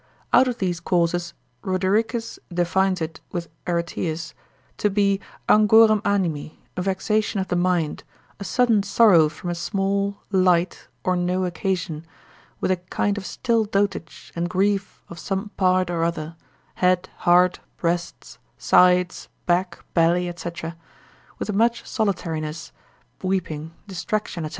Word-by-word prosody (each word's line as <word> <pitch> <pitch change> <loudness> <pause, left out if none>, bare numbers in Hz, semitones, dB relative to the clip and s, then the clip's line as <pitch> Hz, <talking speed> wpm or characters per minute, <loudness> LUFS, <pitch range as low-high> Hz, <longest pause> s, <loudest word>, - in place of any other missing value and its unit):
Out 255 +1 +6
of 245 -2 -2
these 180 -3 -1
causes 175 0 0 0.3
Rodericus 215 +5 0
defines 180 +1 +1
it 160 0 -5
with 170 -2 -4 0.2
Areteus, 170 -2 -2 0.5
to 210 - +2
be 200 -1 +2 0.3
angorem 215 0 +6
animi, 175 -8 -1 0.2
a 180 - -2
vexation 200 +2 0
of 190 - -3
the - - 0
mind, 175 -3 0 0.4
a - - -5
sudden 230 0 +3
sorrow 195 -6 +5
from 170 +3 -6
a - - -1
small, 200 +3 -1
light, 185 -2 +2 0.2
or 185 - +1
no 180 +1 0
occasion, 175 -2 -2 0.6
with - - 0
a 185 - +2
kind 185 +3 -1
of 190 - -7
still 230 -2 +1
dotage 200 -5 -2
and 170 +1 -1
grief 195 +2 0
of 170 - -10
some 195 +1 -3
part 185 -2 +1
or 165 -1 0
other, 165 -1 -2 0.5
head, 185 0 +3
heart, 180 +1 +4 0.2
breasts, 175 0 -3 0.2
sides, 180 0 +3 0.2
back, 175 0 0
belly, 175 +1 +2
&c., 175 0 -5 0.9
with 210 - -3
much 230 +3 +2
solitariness, 165 -7 -2 0.5
weeping, 165 -5 -2 0.2
distraction, 185 -2 -3
&c. - - -4
185 Hz, 130 wpm, -23 LUFS, 170-200 Hz, 0.9 s, Out